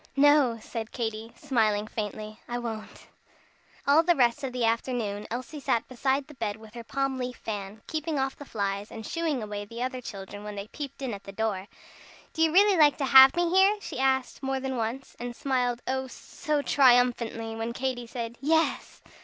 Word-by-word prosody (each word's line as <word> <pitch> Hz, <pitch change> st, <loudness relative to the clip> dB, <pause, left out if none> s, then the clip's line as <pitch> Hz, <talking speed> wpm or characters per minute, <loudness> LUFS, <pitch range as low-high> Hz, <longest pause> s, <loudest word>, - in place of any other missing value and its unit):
"No!" 285 Hz, -4 st, +5 dB
said 220 Hz, 0 st, -6 dB
Katy, 225 Hz, -1 st, -4 dB
smiling 215 Hz, -5 st, +1 dB
faintly, 215 Hz, 0 st, -5 dB
"I 240 Hz, -, -3 dB
won't." 225 Hz, -3 st, -6 dB, 0.8 s
All 285 Hz, +3 st, +6 dB
the 345 Hz, +1 st, +3 dB
rest 250 Hz, +2 st, +2 dB
of 265 Hz, -, -2 dB
the 245 Hz, -2 st, 0 dB
afternoon 225 Hz, -3 st, -1 dB
Elsie 255 Hz, +6 st, -5 dB
sat 235 Hz, -4 st, 0 dB
beside 265 Hz, +2 st, 0 dB
the 300 Hz, -, -13 dB
bed 220 Hz, -6 st, -3 dB
with 220 Hz, -1 st, -14 dB
her 235 Hz, -1 st, -7 dB
palm 270 Hz, +1 st, -2 dB
leaf 250 Hz, 0 st, -3 dB
fan, 205 Hz, 0 st, -6 dB
keeping 315 Hz, -1 st, -2 dB
off 270 Hz, 0 st, -1 dB
the -, -, -10 dB
flies, 200 Hz, -4 st, -3 dB
and 220 Hz, -1 st, -8 dB
"shue" 335 Hz, 0 st, -3 dB
ing 275 Hz, -7 st, 0 dB
away 205 Hz, -1 st, -5 dB
the 230 Hz, +4 st, -5 dB
other 255 Hz, 0 st, -3 dB
children 205 Hz, -2 st, -8 dB
when 210 Hz, 0 st, -6 dB
they 200 Hz, +1 st, -6 dB
peeped 280 Hz, 0 st, -7 dB
in 250 Hz, -4 st, -2 dB
at 200 Hz, -, -8 dB
the 195 Hz, -, -7 dB
door. 200 Hz, -2 st, -2 dB, 0.7 s
"Do 320 Hz, -, -2 dB
you 325 Hz, -1 st, +4 dB
really 395 Hz, +2 st, +5 dB
like 295 Hz, -2 st, +5 dB
to 280 Hz, -, 0 dB
have 265 Hz, 0 st, +9 dB
me 345 Hz, -1 st, +1 dB
here?" 385 Hz, +3 st, +5 dB
she 330 Hz, -, -6 dB
asked, 265 Hz, -1 st, +1 dB
more 270 Hz, -1 st, -1 dB
than 265 Hz, 0 st, -3 dB
once, 240 Hz, +3 st, -4 dB
and 240 Hz, 0 st, -5 dB
smiled, 245 Hz, -2 st, -1 dB
oh, 265 Hz, 0 st, -1 dB
so 295 Hz, +3 st, -3 dB
triumphantly! 240 Hz, -4 st, +3 dB
when 225 Hz, +1 st, -3 dB
Katy 250 Hz, -1 st, -3 dB
said 235 Hz, 0 st, -6 dB
"Yes!" 320 Hz, +3 st, 0 dB
245 Hz, 195 wpm, -28 LUFS, 220-275 Hz, 0.8 s, have